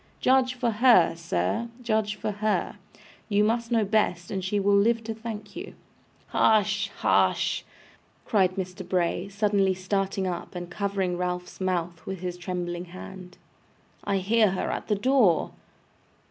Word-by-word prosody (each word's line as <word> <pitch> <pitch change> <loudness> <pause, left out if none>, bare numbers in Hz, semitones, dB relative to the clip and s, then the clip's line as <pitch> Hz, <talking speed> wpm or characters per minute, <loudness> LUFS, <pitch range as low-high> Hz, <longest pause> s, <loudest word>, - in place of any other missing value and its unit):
Judge 255 -1 +3
for 245 -2 0
her, 220 -7 +5
sir, 165 - -1
judge 215 -2 0
for 215 - -3
her. 210 +1 -1 0.5
You 205 0 +3
must 230 +2 0
know 225 -3 +3
best, 195 -4 0
and 190 -2 -2
she 205 +2 0
will 200 +1 +3
live 225 +3 +3
to 225 0 -4
thank 220 -1 -7
you.' - - -7 0.5
'Hush! 210 -2 +3
hush!' - - +2 0.6
cried 190 -4 +2
Mr. 185 0 -5
Bray, 180 0 0
suddenly 200 -2 +1
starting 195 +1 -1
up, 180 0 -4
and 175 0 -6
covering 195 -2 -1
Ralph's 180 0 -4
mouth 175 -3 -2
with 190 -2 -5
his 180 -1 -3
trembling 175 -1 -4
hand. 185 0 -10 0.7
'I 200 -1 0
hear 210 +2 +3
her 190 - -2
at - - -4
the 210 - +2
door! 220 -5 +3
195 Hz, 145 wpm, -26 LUFS, 180-215 Hz, 0.7 s, her